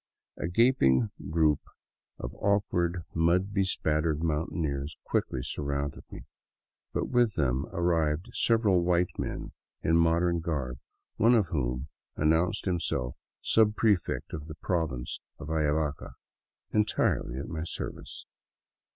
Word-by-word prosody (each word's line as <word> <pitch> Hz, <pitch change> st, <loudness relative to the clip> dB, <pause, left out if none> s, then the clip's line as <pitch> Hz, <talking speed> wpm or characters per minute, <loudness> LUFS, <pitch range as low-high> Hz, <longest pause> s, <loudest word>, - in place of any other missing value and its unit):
A -, -, -3 dB
gaping 85 Hz, -, +4 dB, 0.2 s
group 75 Hz, -2 st, +3 dB, 0.6 s
of -, -, -6 dB
awk 100 Hz, 0 st, +3 dB
ward, 85 Hz, 0 st, 0 dB
mud 90 Hz, +4 st, +2 dB
bespattered 80 Hz, -5 st, +1 dB
mountaineers 75 Hz, -2 st, -2 dB
quickly 60 Hz, -, -1 dB
surrounded 70 Hz, 0 st, -3 dB
me, -, -, -9 dB, 0.7 s
but -, -, -2 dB
with 120 Hz, -5 st, +3 dB
them 65 Hz, -2 st, 0 dB
arrived 85 Hz, -2 st, 0 dB
several 110 Hz, -6 st, +3 dB
white 85 Hz, 0 st, +1 dB
men -, -, -4 dB, 0.3 s
in 80 Hz, +1 st, +4 dB
modern 85 Hz, +1 st, +3 dB
garb, 70 Hz, -7 st, -3 dB, 0.4 s
one 115 Hz, +3 st, +5 dB
of 105 Hz, -7 st, +2 dB
whom 65 Hz, -2 st, -1 dB, 0.3 s
an 75 Hz, +1 st, +3 dB
nounced 90 Hz, +6 st, +1 dB
himself 85 Hz, -9 st, -1 dB, 0.3 s
subprefect 105 Hz, -3 st, +2 dB
of 75 Hz, -1 st, -5 dB
the 75 Hz, -, -7 dB
province 80 Hz, -8 st, -2 dB, 0.2 s
of 75 Hz, -, -7 dB
Ayavaca, 75 Hz, -1 st, 0 dB, 0.6 s
entirely 105 Hz, -, +1 dB
at 70 Hz, -, -4 dB
my 80 Hz, -1 st, -4 dB
service. 85 Hz, -, -6 dB
80 Hz, 120 wpm, -29 LUFS, 75-90 Hz, 0.7 s, one